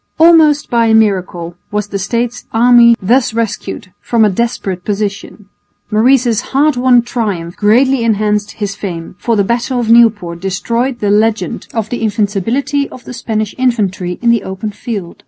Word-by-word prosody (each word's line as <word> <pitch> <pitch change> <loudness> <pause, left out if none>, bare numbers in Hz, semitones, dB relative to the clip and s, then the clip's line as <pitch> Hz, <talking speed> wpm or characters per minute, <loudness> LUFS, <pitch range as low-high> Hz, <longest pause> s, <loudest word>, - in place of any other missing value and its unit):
Almost 315 -3 +4
by 235 -1 +2
a 220 - +3
miracle 185 -5 0
was 210 0 -3
the 200 - -3
States' 235 +4 -3
army 235 0 +5
thus 235 +3 +1
rescued 220 -4 -4
from 230 -2 +2
a 210 - +2
desperate 195 -4 -3
position. 205 0 -4 0.5
Maurice's 235 +1 +3
hard 290 +1 +1
won 245 -1 +3
triumph 200 -9 -3
greatly 245 +4 +2
enhanced 210 -2 0
his 205 -2 -4
fame, 170 -6 -6
for 235 - 0
the 200 - +2
battle 240 +4 -1
of 230 -2 0
Nieuport 210 -8 +3
destroyed 235 +7 -2
the 205 -1 +1
legend 220 +2 0
of 220 -2 -2
the 245 - -3
invincibility 225 +7 -1
of 250 - -12
the - - -8
Spanish 215 -3 -3
infantry 195 -8 -1
in 235 - +4
the 230 -3 +2
open 190 +3 -5
field. 200 -5 -6
220 Hz, 160 wpm, -14 LUFS, 200-240 Hz, 0.5 s, army